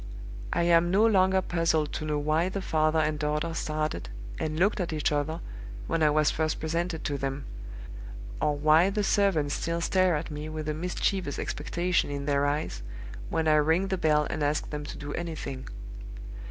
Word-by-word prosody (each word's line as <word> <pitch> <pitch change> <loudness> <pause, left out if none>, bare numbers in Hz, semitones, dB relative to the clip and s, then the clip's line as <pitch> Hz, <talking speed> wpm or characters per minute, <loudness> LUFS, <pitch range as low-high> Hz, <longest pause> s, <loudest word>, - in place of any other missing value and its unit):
I - - +1
am 170 0 +4
no 200 +5 +4
longer 190 -3 +4
puzzled 165 -3 0
to 155 - -3
know 150 -1 0
why 155 +4 +1
the 195 - -3
father 155 -3 +1
and 155 -1 +1
daughter 150 +2 -1
started, 155 - -2 0.3
and 155 0 -2
looked 200 +5 +2
at 175 -3 -2
each 155 -1 0
other, 150 +3 -1 0.4
when 165 - -1
I 155 - +5
was 150 0 +3
first 155 -1 -1
presented 165 +1 -2
to 140 -1 -2
them; 135 +1 -3 1.0
or 150 -1 +1
why 155 +5 +5
the 205 +1 -1
servants 180 -9 +2
still 170 0 -2
stare 185 0 +2
at 150 +1 -4
me 150 +1 -5
with 155 -1 -5
a 155 - 0
mischievous 180 -1 -1
expectation 175 +4 -1
in 140 -1 -4
their 140 0 +2
eyes 145 - -2 0.5
when 160 -1 0
I 155 0 +5
ring 160 +6 +2
the 190 - +1
bell 150 -2 +3
and 155 - -4
ask 145 +1 -1
them 150 -1 -4
to - - -7
do 145 0 -6
anything. 140 -6 -5
155 Hz, 185 wpm, -28 LUFS, 150-170 Hz, 1.0 s, I